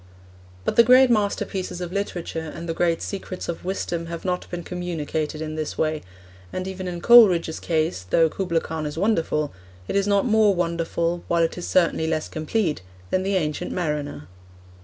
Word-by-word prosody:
But - - -1
the 235 - +9
great 255 +2 +6
masterpieces 200 -4 -1
of 175 -1 -5
literature 170 -5 -3
and 170 - -7
the 165 - -1
great 170 0 +1
secrets 190 -2 -5
of 170 - -4
wisdom 175 -2 -3
have 170 +1 -6
not 180 -1 -2
been 175 -1 -5
communicated 160 -3 -3
in 155 0 -5
this 155 -1 -4
way; 155 -1 0 0.5
and 185 0 -4
even 190 -1 -5
in 175 -1 -5
Coleridge's 185 -9 +6
case, 160 - 0
though 165 - +4
Kubla 170 0 -1
Khan 160 -1 -4
is 150 - -6
wonderful, 165 -6 0 0.3
it - - -3
is 200 0 +2
not 200 +1 +3
more 215 -4 +4
wonderful, 170 0 -1
while 170 -1 +2
it 165 - 0
is 175 - -5
certainly 170 -3 +2
less 160 -1 -1
complete, 155 - -1 0.3
than 185 - +2
the 195 +1 0
Ancient 155 0 -1
Mariner. 150 - -3
170 Hz, 180 wpm, -24 LUFS, 160-190 Hz, 0.5 s, the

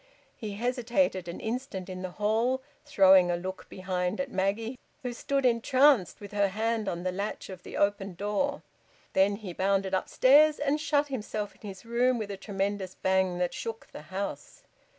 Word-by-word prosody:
He 215 -4 -6
hesitated 240 -3 0
an 170 - -6
instant 220 -5 -4
in 185 -1 -6
the 185 - -4
hall, 225 +7 0 0.2
throwing 190 -8 +6
a 175 - +1
look 185 +2 -6
behind 185 +1 -2
at 275 -1 -2
Maggie, 215 +6 -1 0.2
who 250 -1 -3
stood 275 +3 -1
entranced 255 - +4
with 205 -1 -10
her 205 -1 +2
hand 220 +2 -1
on 175 0 -4
the 185 - 0
latch 200 +3 -4
of 185 -2 -8
the - - -8
open 200 -2 0
door. 210 +10 -1 0.5
Then 195 +1 +4
he 200 -4 -7
bounded 195 +1 0
upstairs, 290 +10 +5
and 290 +1 0
shut 290 -1 +1
himself 215 -5 -4
in - - -26
his 195 +3 -9
room 240 +2 +2
with 210 -3 -4
a - - -4
tremendous 195 -1 -3
bang 190 -1 +1
that 180 0 -1
shook 225 -1 -6
the - - -9
house. 195 +1 -5
205 Hz, 175 wpm, -29 LUFS, 190-245 Hz, 0.5 s, throwing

